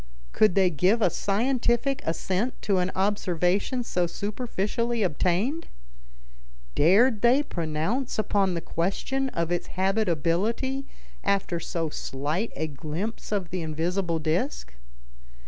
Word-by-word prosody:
Could 215 -5 +3
they 190 -2 +4
give 185 +9 +3
a 190 -6 +3
scientific 240 - +1
assent 190 +8 -1
to 195 -3 +2
an 180 0 0
observation 195 - +1
so 180 -6 0
superficially 225 +3 -2
obtained? 190 - 0 1.1
Dared 210 - +4
they 250 +5 +5
pronounce 170 - -2
upon 200 -4 +1
the 170 - -2
question 265 +13 -1
of 170 -6 -2
its 175 - -1
habitability 195 - 0 0.4
after 195 -3 0
so 165 -1 -2
slight 150 +13 -2
a 160 - -1
glimpse 155 - -5
of 195 -5 -1
the 185 -1 -2
invisible 165 +2 -1
disc? 150 - -1
190 Hz, 115 wpm, -26 LUFS, 170-230 Hz, 1.1 s, they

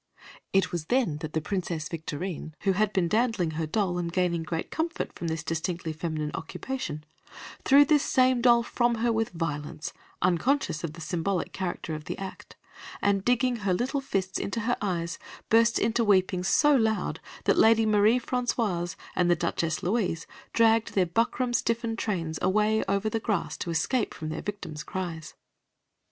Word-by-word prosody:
It 195 -1 +2
was 170 -3 -3
then 235 - +1
that 155 0 -6
the 160 - 0
Princess 170 -3 -3
Victorine, 160 0 -5
who 195 - +2
had 205 +2 +1
been 190 -4 +1
dandling 220 -5 +1
her 160 0 -2
doll 180 +1 0
and 170 -1 -2
gaining 175 -2 +1
great 165 0 -4
comfort 325 +1 -2
from 170 - -5
this 160 -1 -2
distinctly 165 0 -2
feminine 155 -2 -3
occupation, 160 - -5 0.6
threw 285 +2 +7
this 295 0 +4
same 255 -2 +3
doll 235 -1 +5
from 240 0 +1
her 235 - +3
with 225 0 0
violence, 150 -3 -4 0.3
unconscious 180 - +1
of 160 -2 -3
the 165 - -10
symbolic 175 +2 -2
character 175 -4 -3
of 155 0 -6
the - - -4
act, 190 -1 -8 0.4
and 200 -1 +1
digging 245 +1 +2
her 200 -4 0
little 260 +7 -1
fists 190 -7 -2
into 230 +3 -2
her 245 +3 +1
eyes, 170 -4 -2 0.3
burst 230 +1 +5
into 230 +1 +1
weeping 185 -3 +3
so 295 +10 +4
loud 220 -4 +1 0.2
that - - +3
Lady 225 0 +6
Marie 215 +3 +4
Françoise 230 -8 -1 0.2
and 175 -1 +3
Duchess 165 -1 -1
Louise 180 -4 0 0.3
dragged 225 0 +3
their 190 -2 +4
buckram 235 +7 0
stiffened 230 -1 0
trains 165 -7 -2
away 215 +3 +2
over 200 +2 0
the 225 +1 0
grass 210 -5 -1
to - - -4
escape 190 +9 0
from 155 - -5
their 160 - -4
victim's 200 -7 -5
cries. 165 -2 -5
190 Hz, 170 wpm, -27 LUFS, 165-230 Hz, 0.6 s, threw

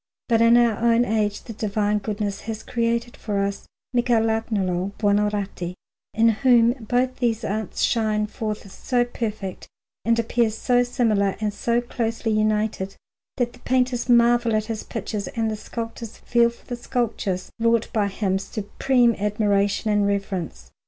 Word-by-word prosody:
But 230 -2 +3
in 230 +1 +6
our 235 -3 +3
own 235 +1 +3
age 210 -2 0
the 230 - -8
Divine 210 0 0
Goodness 205 -1 -3
has 220 -1 -4
created 235 0 -1
for 205 -2 -3
us 200 0 -2 0.3
Michelagnolo 220 -6 +1
Buonarroti, 205 -4 0 0.4
in 225 +1 +5
whom 235 0 +4
both 250 +3 0
these 235 -2 0
arts 215 0 -2
shine 215 -2 +1
forth 210 -2 -5
so 245 +3 0
perfect 215 -5 -5 0.4
and 230 0 +2
appear 230 0 +1
so 245 +3 +1
similar 225 -6 +1
and 210 -1 -1
so 235 +3 0
closely 230 -2 -2
united, 215 -2 0 0.4
that 245 -2 0
the - - -16
painters 250 -1 0
marvel 235 -1 +4
at 215 0 0
his 220 -1 -4
pictures 215 -3 -4
and 225 -1 -1
the - - -2
sculptors 230 +1 -7
feel 235 -1 +3
for 235 - -17
the 245 - -4
sculptures 230 -6 -2
wrought 230 -1 +2
by 210 -2 +2
him 195 -1 -1
supreme 235 +4 +1
admiration 205 0 +1
and 205 -1 +2
reverence. 195 -4 -3
220 Hz, 150 wpm, -23 LUFS, 205-235 Hz, 0.4 s, in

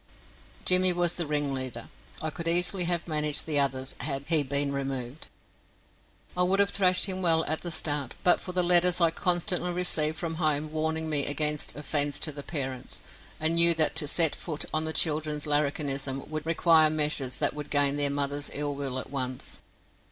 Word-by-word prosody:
Jimmy 185 0 +4
was 175 -1 0
the 170 -3 -2
ringleader. 135 -5 -3 0.4
I 155 - -2
could 170 +1 -6
easily 175 +2 +2
have 175 0 -2
managed 150 -2 0
the 150 -3 +1
others 135 -1 -2
had 140 -2 -4
he 160 -3 +5
been 140 +1 -2
removed. 135 0 -5 1.1
I 180 - 0
would 185 +2 +1
have 200 0 +3
thrashed 185 -2 +4
him 190 -2 -3
well 165 -2 +2
at 155 +1 -2
the 175 - -5
start 150 -4 -1
but 180 - +4
for 180 - -7
the 180 0 -1
letters 175 0 +4
I 170 -2 +2
constantly 180 +1 +1
received 160 -3 0
from 165 -1 -4
home 155 -1 0
warning 160 +1 -3
me 150 -3 0
against 150 +1 0
offence 145 0 0
to 155 - 0
the 145 0 -9
parents, 135 -5 -5 0.4
and 160 +1 0
knew 170 0 +5
that 160 -1 +2
to 155 -3 +2
set 160 0 +5
my - - -8
foot 155 -3 -3
on 155 0 0
the 160 - -3
children's 155 -2 0
larrikinism 140 -2 -2
would 155 0 -6
require 165 -1 +4
measures 150 -4 0
that - - -1
would 150 -1 -8
gain 145 -1 +2
their 145 -1 +2
mother's 145 0 -3
ill 145 0 -2
will 140 -2 -5
at 130 - -7
once. 130 -2 -5
155 Hz, 190 wpm, -26 LUFS, 145-170 Hz, 1.1 s, he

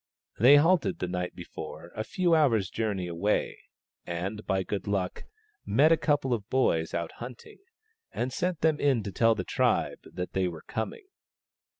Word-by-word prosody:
They 130 +6 +8
halted 145 - +3
the 90 - -3
night 90 0 -3
before 85 - -8
a 110 - -2
few 175 - +1
hours' 115 - +3
journey 105 -5 -2
away, 90 +5 -1 0.4
and 95 +5 -4
by 95 -1 +1
good 100 +1 -4
luck 95 -3 -2 0.4
they - - -6
met 155 +4 +6
a - - +7
couple 145 -5 +1
of 110 -1 -4
boys 80 -11 +1
out 85 -1 -2
hunting, 120 0 -10 0.5
and 125 +1 -3
sent 180 +1 -1
them 160 -2 +2
in 135 -6 +2
to 100 - -5
tell 115 +2 +3
the - - -3
tribe - - +1
that 90 0 -5
they 95 -1 +1
were 85 -3 -7
coming. 110 - -5
110 Hz, 175 wpm, -28 LUFS, 90-140 Hz, 0.5 s, They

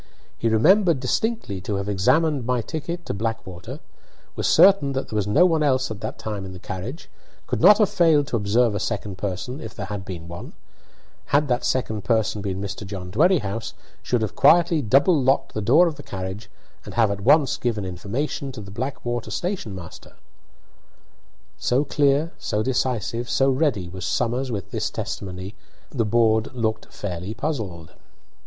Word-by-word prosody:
He 115 - 0
remembered 170 - +4
distinctly 135 - -1
to 100 +2 -3
have 100 0 -3
examined 140 - +2
my 125 0 0
ticket 170 +5 -5
to - - -3
Blackwater; 100 -4 -5 0.6
was - - -1
certain 190 -8 +5
that 135 - -3
there - - -5
was 105 -2 0
no 150 +13 +5
one 165 -3 +2
else 130 -5 +1
at 110 0 -7
that - - -5
time 105 -3 -5
in 95 -1 -8
the - - -8
carriage; 100 - -7 0.4
could - - -2
not 205 - +8
have 210 -2 +4
failed 165 -7 +3
to 125 - -3
observe 110 +2 +2
a 105 - -2
second 95 -1 -3
person, 100 +7 -4
if 110 -4 -8
there 100 - -5
had 100 -1 -5
been 85 -3 -7
one; 85 0 -8 0.7
had 145 +1 +2
that 125 0 +1
second 110 -5 -1
person 110 -2 +1
been 95 -2 -3
Mr. 100 +2 -5
John 95 -2 -7
Dwerrihouse, 115 - +1 0.3
should 120 -3 0
have 105 - -3
quietly 165 +2 +5
double 140 - +4
locked 135 +1 +1
the 110 - -2
door 140 - +5
of 160 -4 -2
the - - -8
carriage 95 -1 -6 0.3
and - - -9
have 115 -3 +3
at 100 0 -4
once 140 +4 +4
given 110 -5 -2
information 115 +10 -3
to 115 - -7
the 100 -1 -10
Blackwater 120 0 -4
station 175 - -3
master. 85 -3 -11 1.5
So 130 +4 +2
clear, 145 +3 +2
so 105 +1 -1
decisive, 120 -2 -1
so 135 0 +3
ready, 130 - 0
was 95 +1 -6
Somers 125 +2 -1
with 100 -5 -5
this - - -1
testimony, 95 +1 -5 0.4
that 140 - -10
the 115 - +3
board 110 +1 +2
looked 110 -2 -2
fairly 95 +1 -5
puzzled. 110 - -4
115 Hz, 175 wpm, -23 LUFS, 100-140 Hz, 1.5 s, not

